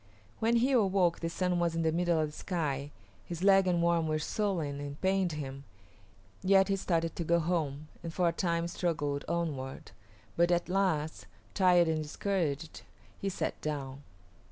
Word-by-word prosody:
When 230 +1 +2
he 245 +4 +3
awoke 195 -8 +3
the 165 - -2
sun 180 +1 0
was 170 -1 +1
in 165 - 0
the 160 - +2
middle 170 0 +1
of 155 -1 0
the 150 - -13
sky. 145 -6 -2 0.3
His 170 0 -6
leg 195 -1 +6
and 175 -1 +2
arm 170 -1 +2
were 155 0 +1
swollen 155 -4 -1
and 145 0 -6
pained 190 -2 +1
him, 135 -2 -6 0.8
yet 195 +1 +4
he 195 - +3
started 165 -4 -1
to 170 - -2
go 170 +1 +3
home, 155 -3 -1
and 165 - -5
for 175 +1 +1
a - - +3
time 170 -1 0
struggled 155 -5 -1
onward; 145 -6 -3 0.4
but 170 +1 +3
at 175 0 +1
last, 180 -5 0 0.3
tired 180 -3 +5
and 160 -1 0
discouraged, 155 -2 -2 0.4
he 195 - -1
sat 190 - -3
down. 140 -3 -4
170 Hz, 175 wpm, -31 LUFS, 155-185 Hz, 0.8 s, leg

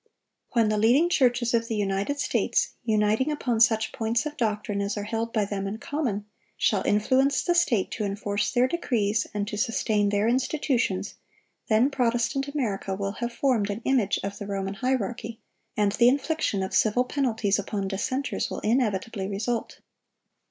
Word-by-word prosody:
When 230 -3 +3
the 215 -1 +1
leading 255 +11 +4
churches 245 -5 +2
of 230 0 +1
the 225 - -2
United 200 +7 -1
States, - - +1
uniting 220 +5 +2
upon 250 -6 -1
such 220 -1 +3
points 230 +4 -1
of 300 0 -4
doctrine 210 -5 -1
as 200 +1 -2
are 205 - -2
held 225 +2 -3
by 215 -3 +1
them 195 -1 -3
in 205 +2 -4
common, 240 -6 -3 0.3
shall 200 -3 +2
influence 260 +7 +2
the 350 - +2
state 245 - +2
to 215 - -3
enforce 205 0 -1
their 250 0 +3
decrees 230 -9 0
and 205 -1 -2
to 210 - -4
sustain 215 -4 +1
their 205 +2 +1
institutions, 245 -6 0 0.5
then 230 +6 +3
Protestant 240 +1 0
America 215 -9 -2
will 195 0 -2
have 240 0 -1
formed 235 -4 +1
an 205 +3 -4
image 245 -7 +2
of 195 0 -5
the 205 - -6
Roman 195 -1 -3
hierarchy, 230 0 -2 0.4
and 205 -1 +3
the 235 +3 +5
infliction 280 -7 0
of 190 - -5
civil 225 +3 +3
penalties 225 -7 0
upon 200 -1 -3
dissenters 255 +8 -2
will - - -5
inevitably 215 -3 0
result. 220 +4 -3
225 Hz, 165 wpm, -26 LUFS, 205-250 Hz, 0.5 s, the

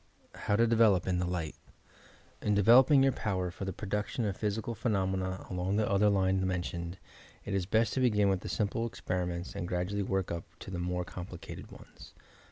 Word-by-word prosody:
HOW 105 - -1
TO 115 +3 +4
DEVELOP 110 -6 +4
IN 90 -1 0
THE 90 - 0
LIGHT 85 -4 -3 0.9
In 105 - +1
developing 125 +7 +6
your 135 - +4
power 95 -7 -2
for 95 - -6
the 95 - -2
production 105 +5 -2
of 100 -2 -1
physi 105 +1 -2
cal 120 - -2
phenomena 95 -5 -1
along 90 +1 -1
the 110 0 +2
other 100 +1 +3
line 95 -1 +2
mentioned, 90 -1 -3 0.5
it 100 - -3
is 95 -2 0
best 110 +3 +2
to - - 0
begin 105 -5 +3
with 95 -2 0
simple 115 +2 -1
experiments 90 -4 -3
and 85 - -3
gradually 90 +3 -1
work 95 -1 -1
up 85 -1 -4 0.2
to - - -8
the 90 - -3
more 90 0 -2
complicated 90 -1 -8
ones. - - -14
95 Hz, 185 wpm, -31 LUFS, 90-105 Hz, 0.9 s, developing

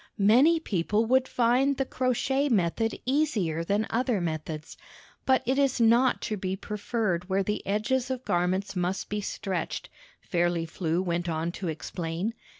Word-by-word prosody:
"Many 250 +11 +5
people 210 - 0
would 260 +2 +3
find 255 +3 +2
the 270 - 0
crochet 265 +3 0
method 225 +1 +1
easier 225 - +1
than 205 +5 0
other 245 -2 +1
methods, 155 -2 -4 0.5
but 260 -1 +4
it 260 +3 +1
is 275 -2 +2
not 235 +3 +4
to 215 - -2
be 185 0 -2
preferred 205 -3 -2
where 195 +1 +2
the 210 +2 -2
edges 225 +6 0
of 260 -1 -4
garments 180 +3 0
must 180 +1 -2
be 210 0 -2
stretched," 190 -3 -4 0.3
Fairly 175 -1 0
Flew 165 +1 -1
went 175 -1 -1
on 165 +1 -1
to 180 +1 -5
explain. 165 +5 -3
205 Hz, 155 wpm, -27 LUFS, 175-250 Hz, 0.5 s, Many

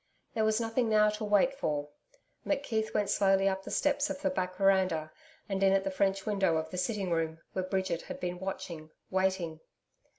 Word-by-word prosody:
There 220 - +1
was 215 +1 +2
nothing 230 +1 0
now 210 -1 +5
to 210 +1 -5
wait 210 +6 +3
for. 150 - -2 0.5
McKeith 230 -7 -1
went 205 -1 0
slowly 195 -1 +3
up 190 0 0
the - - -7
steps 290 0 +1
of - - -4
the 285 - +2
back 185 -7 -2
veranda, 185 -5 +2 0.4
and 195 -2 -2
in 195 0 +5
at 195 0 +3
the 195 - -2
French 195 0 0
window 195 -6 +2
of 160 0 -3
the 180 - -5
sitting 200 -3 -1
room, 160 -1 0 0.2
where 185 - -1
Bridget 190 -3 -1
had - - -8
been 180 0 -3
watching, 170 -4 -5 0.2
waiting. 185 -4 0
195 Hz, 195 wpm, -31 LUFS, 180-215 Hz, 0.5 s, now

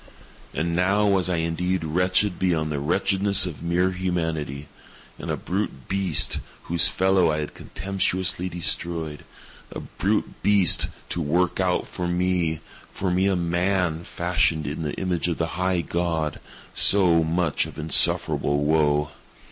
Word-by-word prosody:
And 85 +3 -2
now 95 +4 +2
was 95 -3 +2
I 90 - +1
indeed 85 +2 -1
wretched 90 +4 +1
beyond 80 -4 0
the 75 - -2
wretchedness 95 +7 +2
of 85 -5 -7
mere 85 +2 +1
Humanity. 80 -6 -3 0.5
And - - -7
_a - - -1
brute 90 - -4
beast 95 -5 +1 0.3
_—whose 85 0 +4
fellow 95 -2 +2
I 75 - -1
had 75 -1 -4
contemptuously 95 -2 -2
destroyed—a 85 -3 -6
brute 105 +2 -2
beast 100 -3 +3 0.2
to 85 - -2
work 85 +5 0
out 90 -1 0
for 90 -1 -5
me—for 90 +1 -2
me 95 +2 +2
a 95 - +2
man, 85 -1 0
fashioned 85 -3 0
in 75 +3 -4
the 75 -2 -3
image 90 -3 -1
of 85 - -2
the 80 0 -2
High 90 0 0
God—so 85 +2 +2
much 80 -1 0
of - - -12
insufferable 75 -1 +2
woe! 75 -1 +1
85 Hz, 135 wpm, -24 LUFS, 80-95 Hz, 0.5 s, whose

